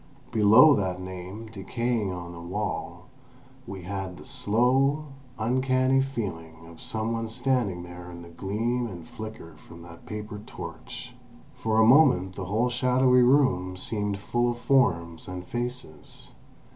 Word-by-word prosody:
Below 110 +8 +7
that 95 -3 -1
name, 95 +4 -7
decaying 110 +1 -2
on 85 -1 -6
the 85 - -9
wall, 100 +5 -4 0.6
we 95 -2 -7
had 95 -1 -5
the - - -12
slow, 135 +7 +2 0.3
uncanny 130 +3 +2
feeling 85 -11 -5
of 80 0 -14
some 110 +1 -3
one 115 0 -2
standing 115 -6 0
there 90 0 -10
in 85 -1 -9
the 85 - -12
gleam 110 +8 -2
and 85 -6 -9
flicker 110 -7 -9
from 85 +1 -14
that 85 -1 -13
paper 105 -1 -6
torch. 125 0 -8 0.4
For 110 -4 -1
a 110 - +6
moment 120 - +5
the 95 0 -5
whole 110 +6 +1
shadowy 125 +1 +4
room 120 -9 +3
seemed 105 +1 -2
full 120 +4 0
of 120 - -3
forms 85 -11 +1
and 90 -1 -6
faces. 120 -10 -6
105 Hz, 145 wpm, -27 LUFS, 90-125 Hz, 0.6 s, Below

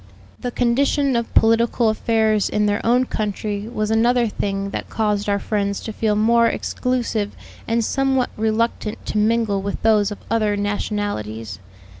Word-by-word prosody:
The 250 - -3
condition 265 +3 +1
of 235 -1 -1
political 230 +1 +3
affairs 220 -1 +1
in 210 0 +1
their 205 0 0
own 245 +2 +3
country 210 -1 -3
was 215 -2 -2
another 235 +2 +3
thing 200 -1 -3
that - - -5
caused 210 -2 -1
our 200 - +2
friends 200 -1 -1
to 220 - -6
feel 215 -1 0
more 230 +2 +4
exclusive 235 -4 -2 0.3
and 230 0 +1
somewhat 265 -1 +1
reluctant 220 0 -1
to 215 - -1
mingle 215 -2 +1
with 200 +1 -4
those 215 -2 +4
of 205 - -6
other 215 -2 +1
nationalities. 205 - -3
215 Hz, 150 wpm, -21 LUFS, 205-235 Hz, 0.3 s, more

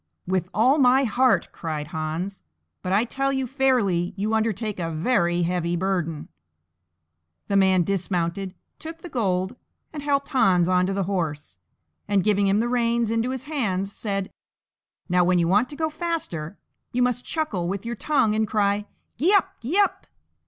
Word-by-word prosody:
"With 180 -1 -1
all 255 +7 +3
my 260 +1 +5
heart," 240 -5 +2
cried 155 -2 -5
Hans; 165 +4 -4 0.4
"but 185 - -3
I 200 +4 +4
tell 270 +3 -1
you 265 -1 -1
fairly 230 -9 +1
you 210 +3 -1
undertake 220 -2 -1
a 165 -1 -2
very 175 0 +1
heavy 175 0 0
burden." 175 -4 -2 1.2
The 200 - +1
man 190 -2 +4
dismounted, 185 0 -2 0.2
took 325 +1 -9
the 350 - -7
gold, 190 - -1 0.4
and 300 - -5
helped 280 -1 0
Hans 185 -9 +3
on 180 0 +3
to 195 - -1
the 195 0 0
horse, 155 - -3 0.5
and, 200 -2 +2
giving 205 -1 +2
him 195 +2 +3
the 235 - +1
reins 235 -2 +1
into 230 +2 0
his 260 -1 -4
hands, 205 -10 -2
said, 195 -2 -3 0.8
"Now, 180 -1 +3
when 180 +1 +3
you 170 -1 +2
want 205 +7 +3
to 290 - -8
go 315 +1 -1
faster, 300 - -4 0.3
you 250 +1 +1
must 250 0 0
chuckle 220 - -2
with 195 +3 -3
your 235 0 -3
tongue 260 -4 +1
and 220 0 +1
cry, 205 0 +1 0.3
'Gee 360 +9 +4
up! 390 - +2
gee 275 - -1
up!'" 405 -1 +1
200 Hz, 170 wpm, -24 LUFS, 180-250 Hz, 1.2 s, my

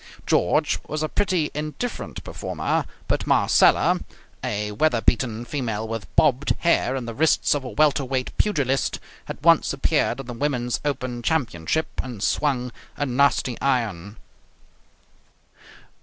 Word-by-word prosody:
George 150 - +2
was 155 0 -3
a 155 - -1
pretty 180 -6 0
indifferent 155 +11 -5
performer, - - -2 0.2
but - - -1
Marcella, - - +4 0.4
a 105 0 -2
weather 120 +3 +2
beaten 115 0 0
female 115 -6 -3
with 115 -2 -5
bobbed 145 -1 +3
hair 150 -6 +2
and 125 -3 -4
the 115 - -4
wrists 160 +7 +3
of 145 -2 -2
a 125 - -6
welterweight 135 0 +1
pugilist, 140 -10 +1 0.3
had - - -8
once 165 -4 +5
appeared 140 -2 +1
in 135 - -6
the 125 - -6
women's 125 -2 -1
open 130 -4 -3
championship 130 - 0 0.2
and 120 -6 -6
swung 125 -4 0 0.3
a 145 - 0
nasty 130 -1 +1
iron. 110 -7 -1
130 Hz, 130 wpm, -23 LUFS, 115-150 Hz, 0.4 s, once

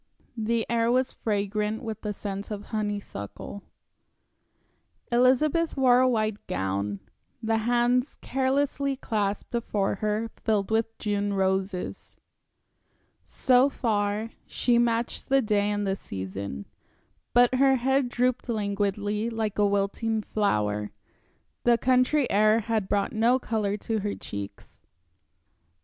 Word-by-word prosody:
The 225 0 0
air 230 0 +2
was 255 +1 +1
fragrant 210 +1 -1
with 220 -2 -5
the 210 - -3
scent 200 -1 -5
of 205 -1 -5
honeysuckle. 205 - -4 1.5
Elizabeth 270 +7 +3
wore 250 -2 +5
a 255 0 +4
white 215 -3 -1
gown; 95 +2 -2 0.4
the 225 0 +1
hands 245 +3 +1
carelessly 275 +1 0
clasped 210 -6 -2
before 210 -5 -1
her 215 0 0
were 230 - -5
filled 210 -2 0
with 225 0 0
June 205 -1 -1
roses. 190 -1 -2 1.1
So 255 +1 +3
far, 215 -3 -1 0.2
she 240 -1 +2
matched 235 0 0
the 270 0 +5
day 210 -4 +1
and 205 0 -1
the 195 0 0
season. 95 - -6 0.7
But 245 +1 +6
her 270 +1 +4
head 265 +1 +1
drooped 250 0 0
languidly, 205 0 -1
like 220 -3 -2
a 205 - +5
wilting 205 +2 0
flower, 105 - 0 0.7
the 240 -1 +5
country 255 +3 +3
air 215 +2 +4
had 220 -3 -1
brought 200 -1 0
no 230 +3 +3
color 215 -5 -1
to 220 +1 -2
her 205 0 -2
cheeks. 100 0 -8
220 Hz, 125 wpm, -27 LUFS, 200-245 Hz, 1.5 s, But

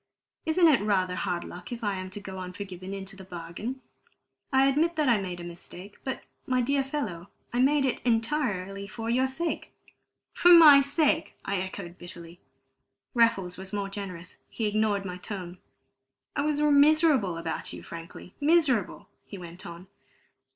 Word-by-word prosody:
Isn't 335 +2 +5
it 295 -8 +5
rather 190 -3 +1
hard 180 -2 -2
luck 175 +4 -9
if 235 -1 -6
I 205 -1 0
am 185 -1 -5
to 190 - -7
go 190 -2 -7
unforgiven 185 0 -7
into 195 0 -7
the 190 - -11
bargain? 180 +8 -6 0.7
I 265 0 +5
admit 310 +5 +2
that 305 -2 +1
I 230 -5 +4
made 180 -2 -5
a - - -7
mistake; 175 +3 -9
but, 265 - -4 0.2
my 255 -1 +2
dear 275 +3 +2
fellow, 210 - -4 0.2
I 245 - 0
made 275 +2 +4
it 260 - 0
entirely 225 -6 0
for 225 +2 -4
your 260 +2 +3
sake." 320 +6 -3 0.6
"For 355 - +5
my 300 -5 +10
sake!" 310 +2 +1
I 200 - 0
echoed 185 -1 -6
bitterly. 170 0 -10 0.7
Raffles 195 -7 +2
was 190 +1 -8
more 200 -1 -2
generous; 185 -3 -7
he 225 - -3
ignored 210 -1 +1
my 180 -1 -5
tone. 180 -2 -7 0.8
"I 285 - +1
was 295 0 0
miserable 295 - +4
about 165 -1 -4
you - - -9
frankly 170 +2 -10
miserable!" 290 - +2 0.2
he 200 - -8
went 175 0 -9
on. 170 +1 -9
205 Hz, 165 wpm, -28 LUFS, 180-270 Hz, 0.8 s, my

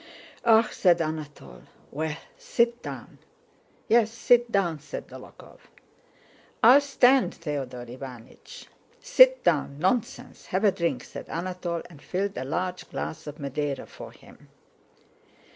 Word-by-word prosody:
"Ah!" 225 -1 +5
said 175 -3 +3
Anatole. 155 - -6 0.3
"Well, 155 +1 -3 0.2
sit 235 +1 0
down." - - -9 0.7
"Yes, 225 -1 +4
sit 240 0 +3
down!" 175 -7 0
said 150 - -8
Dólokhov. - - -14 1.0
"I'll 255 +5 +8
stand, 270 -2 +3
Theodore 135 -6 -5
Iványch." 130 - -11 0.3
"Sit - - +5
down; 140 -3 +1
nonsense! 190 +9 -2
Have 185 +3 -1
a 205 - +5
drink!" 170 -3 -2
said - - -10
Anatole, 175 0 -4
and 150 -5 -16
filled 195 +2 -3
a - - -4
large 180 +6 -3
glass 160 0 -6
of 150 0 -7
Madeira 145 -1 -3
for - - -11
him. - - -19
175 Hz, 125 wpm, -26 LUFS, 150-230 Hz, 1.0 s, I'll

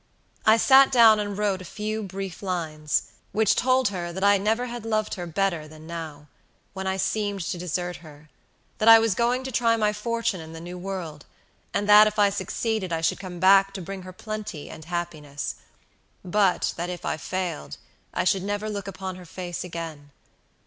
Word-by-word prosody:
I 220 +1 +7
sat 265 +3 +6
down 225 -4 +7
and 205 -1 -3
wrote 200 -3 0
a 185 - -11
few 215 +1 -2
brief 195 -2 -6
lines, 160 -6 -1 0.3
which 220 +1 +3
told 255 -2 +3
her 175 -3 -4
that 190 +3 -5
I 200 0 +5
never 220 +5 +1
had 240 -2 -6
loved 215 -1 -1
her 175 -2 -5
better 170 -3 -1
than 155 0 -13
now, 160 -3 -7 0.5
when 190 -1 -4
I 190 0 0
seemed 205 0 -1
to 175 +2 -3
desert 180 0 -3
her; 155 -2 -15 0.5
that 215 - +1
I 225 - +11
was 225 -2 +2
going 240 +5 +1
to 265 - -5
try 230 -1 +2
my 210 -1 +1
fortune 230 -2 -2
in 160 0 -10
the 165 - -8
new 175 +2 -8
world, 180 -5 -6 0.4
and 205 0 -1
that 210 +1 +9
if 215 - -3
I 205 -1 +4
succeeded 210 -1 -2
I 165 -1 -1
should 165 - +1
come 180 -3 -7
back 195 +2 +5
to - - -4
bring 195 +2 -6
her 185 0 -9
plenty 210 -5 -6
and 160 - -10
happiness; 160 -5 -4 0.7
but 190 0 +2
that 175 +1 -3
if 180 -2 -6
I - - -1
failed 175 - -4 0.3
I - - -1
should 190 +1 +2
never 205 +2 -3
look 200 -1 -5
upon 190 0 -6
her 180 - -11
face 175 0 -5
again. 165 -4 -7
190 Hz, 195 wpm, -25 LUFS, 170-215 Hz, 0.7 s, I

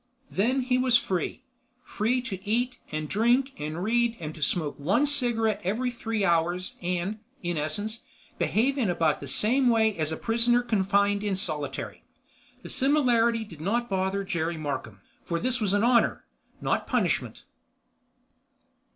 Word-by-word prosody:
Then 250 +7 +1
he 250 0 +1
was 255 -2 +5
free. 190 +4 -3 0.4
Free 240 +4 0
to 190 -7 -6
eat 245 +4 -1
and 155 0 -3
drink 240 - +2
and 155 +4 -4
read 235 +2 +1
and 155 -2 -5
smoke 150 -2 0
one 195 - +2
cigarette 240 -6 +1
every 230 +7 0
three 225 -3 -2
hours 175 +1 +1
and, 180 +4 -2 0.2
in 175 0 -1
essence, 205 +9 -3 0.4
behave 270 +6 +1
in 225 -7 +1
about 165 -3 +1
the 140 - -7
same 245 - +2
way 220 -2 +3
as 155 -2 -2
a 160 - -3
prisoner 240 +1 +2
confined 200 -2 +2
in 205 -2 0
solitary. 150 -7 -4 0.6
The - - -8
similarity 240 -5 +3
did 165 -8 -12
not 235 +6 -1
bother 190 +1 0
Jerry 170 -3 -2
Markham, 130 -9 -5 0.2
for 170 -1 -2
this 250 +2 -1
was 205 -3 +1
honor, 235 +4 +3 0.4
not - - 0
punishment. - - 0
210 Hz, 145 wpm, -27 LUFS, 175-240 Hz, 0.6 s, was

